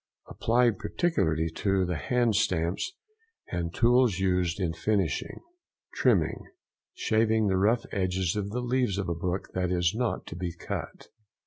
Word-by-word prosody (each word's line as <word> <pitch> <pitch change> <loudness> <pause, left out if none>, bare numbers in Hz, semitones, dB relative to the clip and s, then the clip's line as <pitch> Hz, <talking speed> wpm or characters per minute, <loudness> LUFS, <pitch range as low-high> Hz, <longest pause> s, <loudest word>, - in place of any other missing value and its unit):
—Applied 115 -2 +2
particularly 80 - 0
to 95 -2 +1
the 90 0 -2
hand 115 - +1
stamps 90 - 0 0.6
and 85 -2 -2
tools 120 -2 +3
used 90 -1 0
in 85 -4 0
finishing. 95 -4 -1 0.5
TRIMMING.—Shaving 110 - 0
the 95 - +2
rough 110 +5 +2
edge 95 -2 -1 0.2
of 100 -1 -2
the 125 +4 -3
leaves 125 -5 0
of 100 -3 -2
a - - +1
book 90 +3 -3
that 90 -1 -1
is 90 -2 +2
not 120 0 -1
to - - -8
be 85 -1 -4
cut. 85 - -6
95 Hz, 140 wpm, -28 LUFS, 90-115 Hz, 0.6 s, tools